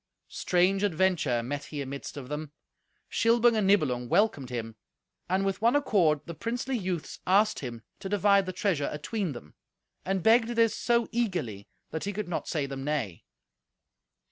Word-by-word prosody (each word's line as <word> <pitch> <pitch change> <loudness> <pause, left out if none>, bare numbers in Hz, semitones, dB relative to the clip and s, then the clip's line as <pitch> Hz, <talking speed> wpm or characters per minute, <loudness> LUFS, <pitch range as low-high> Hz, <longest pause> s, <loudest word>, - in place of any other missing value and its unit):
Strange 185 +2 +2
adventure 170 - +1
met 145 +4 -4
he 150 - -6
amidst 140 +1 -6
of 135 -3 -7
them. 150 +1 -5 0.6
Shilbung 235 +1 +3
and 210 -3 +2
Nibelung 130 -11 +2
welcomed 170 - +2
him, 115 -2 -5 0.5
and 190 +2 +1
with 195 0 -1
one 235 +4 +4
accord 180 - +3
the 170 - -6
princely 245 - -3
youths 185 -7 -3
asked 205 +4 +3
him 120 -4 -7 0.2
to 190 - -6
divide 200 -1 +3
the - - -1
treasure 180 -6 0
atween 165 +3 -3
them, 75 - -11 0.5
and 190 -2 -1
begged 225 +1 +5
this 230 -2 +2
so 235 -1 +1
eagerly 175 - -2 0.2
that 160 +3 -3
he 205 - -2
could 210 0 -4
not 175 - -3
say 150 -4 -1
them 135 -1 -6
nay. 135 - -3
180 Hz, 165 wpm, -28 LUFS, 140-210 Hz, 0.6 s, begged